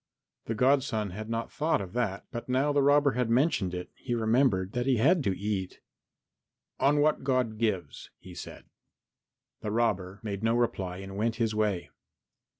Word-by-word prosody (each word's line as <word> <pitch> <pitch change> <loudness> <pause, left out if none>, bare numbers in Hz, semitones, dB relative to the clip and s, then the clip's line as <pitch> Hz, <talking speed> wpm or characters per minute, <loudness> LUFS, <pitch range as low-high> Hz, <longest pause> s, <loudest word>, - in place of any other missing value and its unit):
The 115 - -2
godson 125 -4 +2
had 110 +4 -7
not 115 0 -3
thought 160 +2 +1
of 95 -2 -7
that, 110 -5 -2
but 120 0 -6
now 135 +3 +2
the 145 - +3
robber 145 0 +4
had 125 -3 -1
mentioned 115 - +2
it 90 0 -6
he 120 -2 -3
remembered 110 -4 +2
that 125 +2 -2
he 130 -2 +3
had 155 +8 +4
to 95 - 0
eat. 100 -2 -3 1.0
"On 145 +2 +3
what 150 -1 +2
God 125 -5 0
gives," 95 -10 -2
he 90 - -12
said. - - -9 0.9
The 105 - -4
robber 105 -4 0
made 100 -2 -4
no 115 +1 +2
reply 95 -7 -1
and 95 0 -8
went 115 +2 0
his 115 -2 0
way. 105 -4 -1
115 Hz, 170 wpm, -29 LUFS, 100-130 Hz, 1.0 s, robber